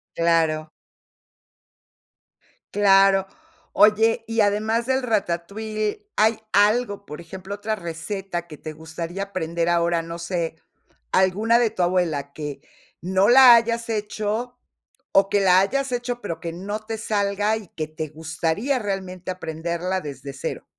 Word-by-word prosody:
Claro. 160 -2 +1 2.0
Claro. 195 -1 +5 0.5
Oye, 220 +3 +4
y 225 0 -2
además 215 +3 +1
del 265 0 0
ratatouille, 215 - -2
¿hay 220 +1 +3
algo?, 205 0 +2
por 150 -2 -8
ejemplo, 190 +4 -7
otra 215 +2 -2
receta 175 0 -5
que 150 -3 -10
te 155 - -7
gustaría 165 +4 -6
aprender 170 -3 -2
ahora, 170 0 +2
no 165 +1 -7
sé, 170 -2 -3 0.6
alguna 210 +6 +3
de 235 -2 +3
tu 180 - -1
abuela 165 -6 0
que 145 -2 -6 0.4
no 190 +3 +2
la 250 -1 +9
hayas 230 0 0
hecho, 215 +3 -3 0.6
o 195 0 +4
que 205 - +2
la 185 -1 +6
hayas 270 +7 -1
hecho, 245 0 -3
pero 165 -5 -5
que 165 -1 -5
no 200 +5 -4
te 220 +1 -5
salga, 210 0 0
y 210 - -10
que 155 -1 -5
te 155 0 -5
gustaría 160 - -1
realmente 190 -3 -5
aprenderla 170 +2 -3
desde 140 -2 -7
cero. 135 - -5
195 Hz, 135 wpm, -23 LUFS, 170-215 Hz, 2.0 s, la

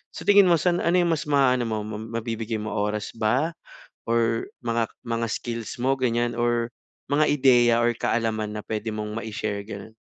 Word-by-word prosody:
Sa - - -7
tingin 200 -1 +7
mo 170 - +6
san 175 +1 +1
ano 170 +2 +2
'yung 170 -1 +2
mas 155 0 -2
maano 130 -3 +3
mo, 110 -1 -1
mabibigay 115 +1 -4
mo, 110 -1 -4
oras 105 0 -2
ba 125 +9 +1 0.6
or 115 -1 +1 0.2
mga 115 -1 0 0.2
mga 115 0 -1
skills 115 -1 -4
mo 135 +1 +2
ganyan 120 -1 0
or 120 0 +1 0.4
mga 150 +2 +4
ideya 125 -4 +5
or 120 0 +3
kaalaman 110 -2 -1
na 105 - -4
pwede 110 0 -3
mong 105 0 -4
ma-ishare, 105 -2 -4
ganun? 100 +1 -8
115 Hz, 175 wpm, -25 LUFS, 110-125 Hz, 0.6 s, tingin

